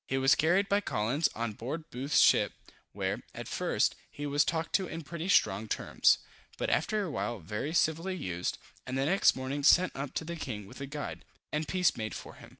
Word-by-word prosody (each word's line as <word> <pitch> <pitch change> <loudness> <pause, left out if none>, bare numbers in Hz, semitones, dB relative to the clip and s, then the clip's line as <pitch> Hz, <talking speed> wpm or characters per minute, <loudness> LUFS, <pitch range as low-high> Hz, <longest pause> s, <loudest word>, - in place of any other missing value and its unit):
He 135 - 0
was 135 +1 +5
carried 185 +6 +3
by 200 +1 +2
Collins 130 - 0
on 115 -1 -2
board 155 +9 -6
Booth's 135 +4 +1
ship, - - +5 0.4
where, - - -2
at - - -6
first, - - +1 0.2
he 145 - -6
was 145 0 +3
talked 165 0 -2
to 190 -2 +2
in 165 0 -6
pretty 170 +5 -5
strong 105 - +3
terms; - - +3 0.4
but - - -1
after 210 +8 +1
a 180 - -4
while 120 -4 -2
very 105 - -4
civilly 165 +3 +1
used, 90 - -3 0.3
and 130 +1 -2
the 135 - +1
next 190 +6 +4
morning 130 +2 -3
sent 175 +6 +5
up 140 0 -5
to 160 - -2
the 170 +1 -4
king 115 -10 -5
with 100 - -12
a 140 - -4
guide, 145 +1 -6 0.3
and 150 +1 -1
peace 185 -1 +2
made 110 -1 -4
for - - -8
him. - - -14
145 Hz, 210 wpm, -30 LUFS, 125-165 Hz, 0.4 s, was